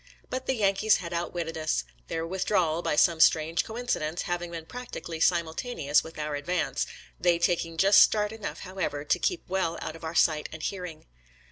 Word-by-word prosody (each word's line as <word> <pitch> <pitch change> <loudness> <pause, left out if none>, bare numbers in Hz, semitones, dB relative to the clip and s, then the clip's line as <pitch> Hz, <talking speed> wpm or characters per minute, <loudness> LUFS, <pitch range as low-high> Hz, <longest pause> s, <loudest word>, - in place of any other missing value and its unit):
But 255 0 -3
the 265 - +1
Yan 200 -4 +3
kees 215 +2 +3
had 170 -2 -5
outwitted 170 -1 -3
us, 155 - 0 0.2
their 165 0 -2
withdrawal, 175 -2 +1
by 150 - 0
some 165 +2 +4
strange 160 +1 +4
coincidence, 220 -9 -2
having 175 0 -3
been 165 -1 -7
practically 240 -8 -7
simultaneous 165 - +1
with 160 - -11
our 150 -1 -3
advance 165 +4 -1 0.2
— - - -20
they 175 -1 +3
taking 170 -1 0
just 195 +4 +7
start 210 -1 +4
enough, 220 -2 -6
however, 180 -6 -3
to - - +2
keep 360 - 0
well 180 -3 -1
out 155 - -5
of 165 - -13
our 160 +1 -5
sight 155 -2 +3
and 160 0 -8
hearing. 180 -5 -5
170 Hz, 190 wpm, -28 LUFS, 160-195 Hz, 0.2 s, just